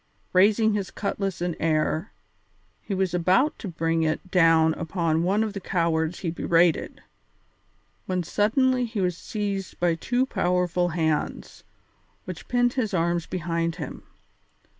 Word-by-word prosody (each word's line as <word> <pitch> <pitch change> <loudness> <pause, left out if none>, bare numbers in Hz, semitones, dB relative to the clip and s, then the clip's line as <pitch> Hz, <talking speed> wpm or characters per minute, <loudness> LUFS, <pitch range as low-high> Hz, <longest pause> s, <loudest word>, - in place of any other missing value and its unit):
Raising 215 +4 +4
his 200 -2 -2
cutlass 195 -3 -3
in 175 -2 -1
air, 160 +4 0 0.7
he 200 - -4
was 190 -2 0
about 185 - +2
to 215 - -6
bring 165 -1 -1
it 160 +3 -2
down 165 -2 +5
upon 165 -1 -1
one 195 +5 +2
of 215 -2 -3
the 200 - -4
cowards 165 -2 -1
he 170 - -2
berated, 170 0 +1 1.0
when 185 -1 -1
suddenly 250 - +2
he 225 -2 -4
was 180 -2 0
seized 200 0 -4
by 175 -1 +2
two 245 +10 0
powerful 180 -5 0
hands, 160 -2 -2 0.6
which 180 -3 -8
pinned 245 0 +2
his 220 -7 -1
arms 170 0 0
behind 170 -1 -2
him. - - -7
180 Hz, 140 wpm, -25 LUFS, 165-205 Hz, 1.0 s, down